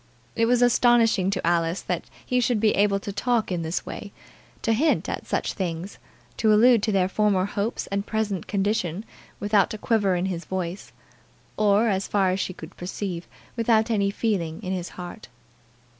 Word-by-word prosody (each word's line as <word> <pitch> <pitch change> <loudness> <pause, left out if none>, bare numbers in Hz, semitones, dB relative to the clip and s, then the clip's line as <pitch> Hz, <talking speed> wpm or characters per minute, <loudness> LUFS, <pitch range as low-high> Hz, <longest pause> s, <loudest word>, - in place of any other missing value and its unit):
It 230 0 +2
was 245 0 +3
astonishing 230 -5 +4
to 190 -3 -2
Alice 170 +1 +1
that - - -3 0.2
he 250 - +1
should 240 -2 +1
be 215 0 +3
able 200 0 +2
to 200 - -6
talk 235 -1 0
in 175 -2 -1
this 160 +2 -3
way, 205 - -7 0.5
to 225 - +2
hint 300 +8 +2
at - - -4
such - - -1
things, 180 0 -4 0.4
to 220 -1 +3
allude 230 +2 +6
to 215 - 0
their 190 -2 +2
former 195 -1 +2
hopes 205 +2 -2
and 200 0 -2
present 210 -5 -2
condition, 200 -1 -1 0.3
without 205 0 +2
a - - -6
quiver 205 -4 +1
in 175 +1 -1
his 180 -3 -3
voice, 185 0 -4 0.6
or, 210 +1 +3
as 195 -2 0
far 195 -3 +2
as 185 - -1
she 190 - -2
could 170 -1 -11
perceive, 180 -1 -5 0.3
without 230 -1 +2
any 200 -3 +2
feeling 190 -7 -1
in 185 0 -2
his 180 -2 -4
heart. 180 +5 -8
200 Hz, 180 wpm, -25 LUFS, 185-220 Hz, 0.6 s, allude